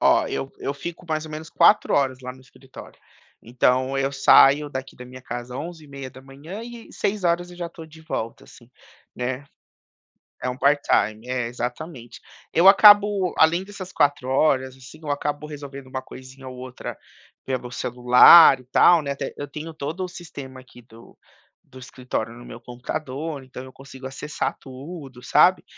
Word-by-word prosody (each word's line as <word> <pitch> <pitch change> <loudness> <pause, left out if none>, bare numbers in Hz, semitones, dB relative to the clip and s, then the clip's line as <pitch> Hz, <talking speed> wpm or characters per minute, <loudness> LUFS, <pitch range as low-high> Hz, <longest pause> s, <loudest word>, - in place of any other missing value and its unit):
Ó, - - +4
eu 135 - -4
eu 140 - -4
fico 170 +3 -8
mais 155 0 -2
ou 155 - -10
menos 155 +1 -7
4 175 +5 +4
horas 135 -2 +1
lá 125 0 -7
no 130 - -17
escritório, 130 +1 -15 0.4
então 130 +3 +1
eu 135 0 0
saio 140 +1 +5
daqui 130 0 -7
da 125 - -10
minha 130 +1 -12
casa 120 0 -7
11h30 140 - -9
e 235 -1 -11
18h 175 -3 -1
eu 175 - -13
já 175 -1 -4
estou 165 -1 -11
de 160 0 -16
volta, 115 -7 -5
assim, 120 +1 -18 0.4
né. 125 +2 -4 1.0
É - - 0
um 125 - -7
part-time. 125 -6 +1
É, 125 -2 -2
exatamente. 125 +1 -7 0.3
Eu 175 +3 +3
acabo 205 -2 +6
além 165 +3 +4
dessas 195 -2 -10
4 145 -3 +1
horas, 130 -1 +1
assim, 130 +4 -14
eu 155 - -8
acabo 145 +1 -3
resolvendo 140 -2 -9
uma 130 0 -6
coisinha 130 +1 -12
ou 130 - -10
outra 130 0 -8 0.5
pelo 125 -2 -4
celular 125 +5 +7
e - - -18
tal, 165 +6 +5
né, 140 -1 -3
até 140 - -5
eu 145 - -6
tenho 155 +3 -8
todo 155 +5 -5
o - - -5
sistema 140 -7 -10
aqui 125 -1 -17
do 115 0 -18 0.5
do 130 -1 -15
escritório 125 -3 -5
no 120 0 -13
meu 120 - -11
computador, 135 +3 -6
então 130 0 -10
eu 130 - -13
consigo 135 -1 -14
acessar 150 +3 -4
tudo, 135 -1 -10
sabe, - - +4
135 Hz, 170 wpm, -23 LUFS, 130-160 Hz, 1.0 s, celular